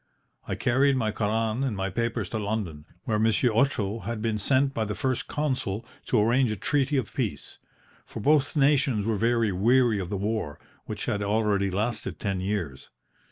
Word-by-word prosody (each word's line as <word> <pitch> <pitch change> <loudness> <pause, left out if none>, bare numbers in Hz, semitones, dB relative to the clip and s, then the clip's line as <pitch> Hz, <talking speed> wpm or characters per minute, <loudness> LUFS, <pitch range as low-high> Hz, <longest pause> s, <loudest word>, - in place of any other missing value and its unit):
I - - -2
carried 135 +2 +2
my 110 -4 0
Koran 110 +3 0
and 125 -7 -1
my 95 0 -2
papers 115 -1 -1
to 110 - -2
London, 100 -8 -3 0.2
where 110 -2 0
Monsieur 115 +2 +2
Otto 115 -4 +1
had 115 0 -4
been 110 -1 -1
sent 135 +5 +2
by 115 - -1
the 105 -1 -3
First 130 -4 -1
Consul 130 -7 -2 0.2
to 120 - +3
arrange 120 +4 +3
a 110 - -1
treaty 140 +7 +1
of 125 -7 -2
peace; - - -4 0.5
for - - -7
both 145 +5 +2
nations 135 -6 +3
were 110 -1 +1
very 115 -1 +2
weary 115 +3 +3
of 90 -2 -4
the 100 - -2
war, 105 -6 -2 0.3
which - - -5
had 105 - -1
already 100 -1 +1
lasted 110 +5 -2
ten 100 -3 -2
years. 90 -9 -3
110 Hz, 180 wpm, -26 LUFS, 105-130 Hz, 0.5 s, to